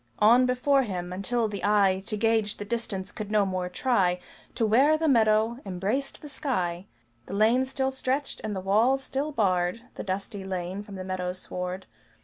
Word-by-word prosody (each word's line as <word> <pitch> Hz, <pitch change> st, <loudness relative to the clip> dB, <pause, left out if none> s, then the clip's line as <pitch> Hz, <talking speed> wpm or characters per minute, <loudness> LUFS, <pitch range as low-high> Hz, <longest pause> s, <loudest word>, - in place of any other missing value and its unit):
On 240 Hz, +4 st, +6 dB
before 270 Hz, +2 st, +3 dB
him, 180 Hz, -6 st, -4 dB
until 225 Hz, +5 st, 0 dB
the 205 Hz, -2 st, -6 dB
eye 200 Hz, -2 st, +3 dB
To 215 Hz, -, -2 dB
gauge 220 Hz, -1 st, +1 dB
the 205 Hz, -, -6 dB
distance 205 Hz, -3 st, -3 dB
could 215 Hz, -2 st, -6 dB
no 210 Hz, -1 st, +3 dB
more 185 Hz, -1 st, -2 dB
try, 180 Hz, -4 st, +1 dB, 0.4 s
To 230 Hz, -, +1 dB
where 270 Hz, +8 st, +4 dB
the 320 Hz, 0 st, 0 dB
meadow 225 Hz, -2 st, +3 dB
embraced 200 Hz, +11 st, -3 dB
the -, -, -7 dB
sky, 190 Hz, -, -2 dB, 0.4 s
The -, -, -5 dB
lane 230 Hz, +5 st, +4 dB
still 265 Hz, 0 st, -1 dB
stretched, 265 Hz, +1 st, -2 dB
and 215 Hz, -2 st, -3 dB
the 190 Hz, -, -3 dB
walls 230 Hz, +8 st, +3 dB
still 280 Hz, +4 st, -2 dB
barred 185 Hz, -4 st, +1 dB
The -, -, -6 dB
dusty 195 Hz, 0 st, -4 dB
lane 185 Hz, 0 st, -4 dB
from 205 Hz, -1 st, -10 dB
the 185 Hz, -, -5 dB
meadow 185 Hz, -1 st, -3 dB
sward. 180 Hz, 0 st, -5 dB
210 Hz, 180 wpm, -27 LUFS, 190-250 Hz, 0.4 s, On